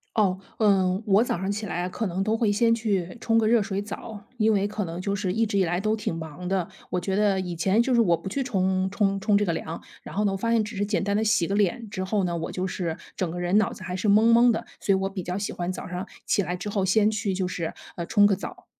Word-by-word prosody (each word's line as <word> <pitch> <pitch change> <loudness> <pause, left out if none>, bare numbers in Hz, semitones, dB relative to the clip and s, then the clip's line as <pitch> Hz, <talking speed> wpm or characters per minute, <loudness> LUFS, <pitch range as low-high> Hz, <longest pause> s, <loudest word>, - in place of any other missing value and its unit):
哦， 190 -4 +2 0.2
嗯， 195 -2 +3
我 205 +2 +4
早 210 - -1
上 190 +2 -2
起 210 +1 -3
来 175 +1 -2
可 220 +3 -3
能 185 +2 -1
都 215 +2 +1
会 225 -3 +2
先 230 +2 +3
去 200 -6 -1
冲 225 0 +2
个 220 - +3
热 230 0 +4
水 195 -1 -2
澡， 205 0 -8
因 220 0 +3
为 200 -1 +2
可 210 0 -3
能 165 +1 -6
就 200 +2 -1
是 190 -2 -1
一 225 +4 +1
直 200 -2 0
以 - - +4
来 175 0 0
都 215 +2 +1
挺 210 -6 -3
忙 160 +2 -7
的， 185 -2 0 0.2
我 180 - 0
觉 190 +2 -2
得 200 -2 +2
以 180 -2 -4
前 190 +6 +2
就 260 - 0
是 235 - +5
我 170 -6 +3
不 - - -9
去 240 +9 -2
冲 190 -6 0
冲 195 0 +1
冲 210 0 +3
这 205 - +1
个 170 - 0
凉， 160 0 -5 0.2
然 - - -10
后 210 - +1
呢 195 -1 +1
发 230 +4 -1
现 230 -2 +3
只 210 +1 -7
是 200 - 0
简 205 -1 0
单 200 0 0
地 215 - +2
洗 215 -5 +3
个 195 - -2
脸 210 +3 +1
之 190 -3 -3
后 195 +1 0
呢， 175 -1 -1
我 165 -1 -3
就 185 0 -2
是 175 -3 -3 0.2
整 180 -3 -1
个 175 - -5
人 175 +3 +2
脑 215 - +1
子 185 - -11
还 180 -1 -4
是 190 - -2
懵 215 +3 +5
懵 235 +1 +6
的， 225 - 0
所 - - 0
以 - - +5
我 195 - -1
比 195 -1 -5
较 180 +1 -3
喜 205 - -3
欢 175 +1 -3
早 - - -6
上 180 +1 -5 0.2
起 - - +2
来 180 -2 -2
之 180 +3 -6
后 200 -1 0
先 210 +3 +3
去 205 -2 -1
就 185 -1 -1
是， 170 -3 -3 0.2
呃， 170 - -4
冲 205 -2 +5
个 205 - +4
澡。 190 - -9
195 Hz, 315 characters per minute, -25 LUFS, 185-215 Hz, 0.2 s, 懵